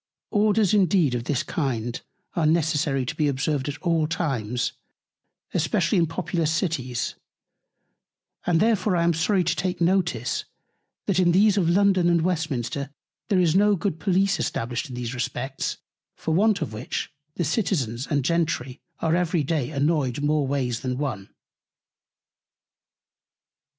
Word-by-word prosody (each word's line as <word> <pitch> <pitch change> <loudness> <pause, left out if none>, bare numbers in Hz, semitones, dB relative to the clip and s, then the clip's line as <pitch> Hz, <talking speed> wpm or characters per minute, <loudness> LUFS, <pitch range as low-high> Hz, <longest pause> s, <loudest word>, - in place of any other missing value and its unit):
Orders 210 -1 +3
indeed 185 -8 +3
of 120 -1 -2
this 135 -3 0
kind 120 -6 -2 0.3
are 160 -3 +2
necessary 150 -4 +1
to - - -3
be 150 - +1
observed 140 0 -1
at 145 - -5
all 165 -3 +2
times, 125 -8 -1 0.8
especially - - +1
in 165 - +3
populous 165 -1 -1
Cities; 140 -8 -1 1.3
and 170 -2 +3
therefore 215 -3 +2
I 170 - +2
am 170 0 +3
sorry 180 +4 +2
to 170 +1 0
take 180 -1 -2
Notice, 170 - +1 0.6
that 190 -2 +1
in 175 -2 +4
these 200 +2 +5
of 180 -5 +2
London 190 -1 +4
and 170 -2 +3
Westminster 145 -5 -2 0.4
there 200 - +3
is 170 -4 +3
no 205 +1 +5
good 165 -2 -2
Police 195 0 +2
established 120 0 -2
in 125 - -7
these 125 0 -4
Respects; 130 +2 -3 0.4
for 160 - -2
want 200 0 +3
of 115 -8 -6
which 110 +6 -4 0.2
the 175 - -1
Citizens 140 - -1
and 145 -3 0
Gentry 155 -5 -1 0.2
are 160 0 +2
every 175 -2 +1
Day 145 -3 -1
annoyed 145 -3 0
more 150 -1 +2
ways 130 -4 -1
than 125 -1 -3
one. 120 -9 -3
160 Hz, 145 wpm, -25 LUFS, 135-180 Hz, 1.3 s, these